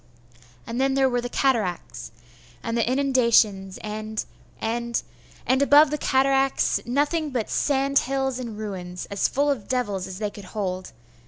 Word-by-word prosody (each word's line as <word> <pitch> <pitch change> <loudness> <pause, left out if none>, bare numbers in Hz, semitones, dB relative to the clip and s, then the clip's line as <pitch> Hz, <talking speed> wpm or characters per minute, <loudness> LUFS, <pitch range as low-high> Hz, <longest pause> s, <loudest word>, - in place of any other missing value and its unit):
And 235 +3 -3
then 270 0 +2
there 270 -1 +4
were 245 -1 0
the 245 - -4
cataracts, 205 - -1 0.5
and 230 - -2
the 235 +1 +1
inundations 235 -8 +2
and 215 0 -4 0.3
and 235 +1 -2 0.4
and 260 +1 +2
above 285 +2 +6
the 300 - 0
cataracts, 270 0 +2
nothing 295 +5 0
but 245 -5 -3
sand 275 -1 +2
hills 265 -1 -1
and 230 -4 -6
ruins, 180 -4 -6
as 200 - +1
full 285 +1 +1
of 245 -8 -4
devils 205 -8 -1
as 185 - -7
they 210 0 -2
could 205 -2 -11
hold.... 185 -2 -3
240 Hz, 155 wpm, -24 LUFS, 210-270 Hz, 0.5 s, above